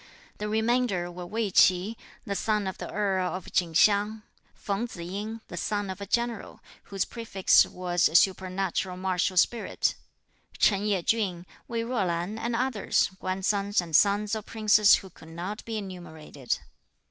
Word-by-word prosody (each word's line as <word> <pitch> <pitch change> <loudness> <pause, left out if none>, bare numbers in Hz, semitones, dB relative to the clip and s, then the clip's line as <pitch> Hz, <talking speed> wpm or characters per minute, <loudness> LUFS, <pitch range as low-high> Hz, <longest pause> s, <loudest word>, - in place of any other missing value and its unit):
The 210 0 -3
remainder 220 -5 0
were 175 0 -8
Wei 215 0 -2
Chi, 185 +5 +4 0.3
the 200 - -2
son 210 0 0
of 190 - -5
the - - -6
earl 190 -3 0
of 185 - -8
Chin 170 -3 0
Hsiang; 210 +3 +3 0.3
Feng 205 +4 -3
Tzu 175 -7 -8
ying, 210 +5 -5
the - - -8
son 205 -2 -2
of 190 +2 -9
a 200 - -5
general, 235 +1 -2 0.3
whose 195 -1 -2
prefix 225 -5 +3
was 175 -2 0
supernatural 185 -1 0
martial 185 0 -1
spirit; 230 +5 +1 0.6
Ch'en 205 0 +3
Yeh 195 -4 0
chün, 185 -6 0 0.2
Wei 230 -1 -2
Jo 235 -3 -1
lan 175 +5 -2
and 235 +1 -2
others, 240 -5 +1
grandsons 195 +2 0
and 170 -3 -2
sons 205 +3 +3
of 220 -1 -3
princes 215 -2 +5
who 190 - -7
could 160 - -15
not 180 +6 -6
be 225 -1 -4
enumerated. 160 - -5
200 Hz, 160 wpm, -27 LUFS, 180-215 Hz, 0.6 s, princes